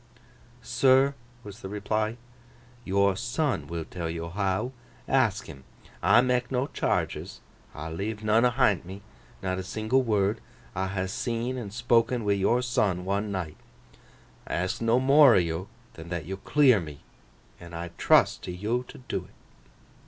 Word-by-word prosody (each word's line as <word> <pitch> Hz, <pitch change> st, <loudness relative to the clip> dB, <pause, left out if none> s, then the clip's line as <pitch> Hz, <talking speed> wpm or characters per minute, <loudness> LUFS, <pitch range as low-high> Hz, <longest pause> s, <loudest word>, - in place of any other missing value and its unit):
'Sir,' 135 Hz, +1 st, +4 dB, 0.3 s
was 105 Hz, +1 st, -10 dB
the 95 Hz, -, -6 dB
reply: 110 Hz, +2 st, -2 dB, 0.7 s
'yor 100 Hz, -1 st, +2 dB
son 120 Hz, +7 st, -1 dB
will 85 Hz, -1 st, -4 dB
tell 85 Hz, -2 st, -5 dB
yo 85 Hz, 0 st, -4 dB
how. 95 Hz, +6 st, -1 dB, 0.4 s
Ask 120 Hz, -7 st, +2 dB
him. 70 Hz, -5 st, -11 dB, 0.4 s
I 120 Hz, -, +6 dB
mak 125 Hz, 0 st, 0 dB
no 130 Hz, +1 st, +1 dB
charges: -, -, -2 dB, 0.4 s
I 80 Hz, +2 st, -6 dB
leave 105 Hz, +6 st, -4 dB
none 110 Hz, +2 st, +3 dB
ahint 125 Hz, -5 st, +3 dB
me: 95 Hz, +3 st, -10 dB, 0.4 s
not 95 Hz, 0 st, -1 dB
a -, -, -4 dB
single 110 Hz, +7 st, 0 dB
word. 105 Hz, -2 st, 0 dB, 0.3 s
I 95 Hz, +1 st, -1 dB
ha' 95 Hz, -1 st, -2 dB
seen 115 Hz, +5 st, -2 dB
an' 120 Hz, -5 st, -5 dB
spok'n 115 Hz, +2 st, +1 dB
wi' 100 Hz, -, +3 dB
yor 110 Hz, +6 st, +2 dB
son, 105 Hz, -8 st, 0 dB
one 100 Hz, +2 st, -1 dB
night. 90 Hz, -6 st, -4 dB, 0.9 s
I -, -, -2 dB
ask 90 Hz, +6 st, -2 dB
no 115 Hz, +2 st, +3 dB
more 140 Hz, -1 st, +7 dB
o' -, -, +6 dB
yo 85 Hz, +1 st, -1 dB, 0.3 s
than 80 Hz, +1 st, -10 dB
that 85 Hz, -3 st, -4 dB
yo 95 Hz, +3 st, -5 dB
clear 130 Hz, +1 st, +4 dB
me—an' 85 Hz, +2 st, -13 dB
I 85 Hz, +1 st, -5 dB
trust -, -, +4 dB
to -, -, -4 dB
yo 105 Hz, +7 st, -1 dB
to 125 Hz, -, -13 dB
do -, -, -2 dB
't. -, -, -23 dB
105 Hz, 160 wpm, -27 LUFS, 95-120 Hz, 0.9 s, more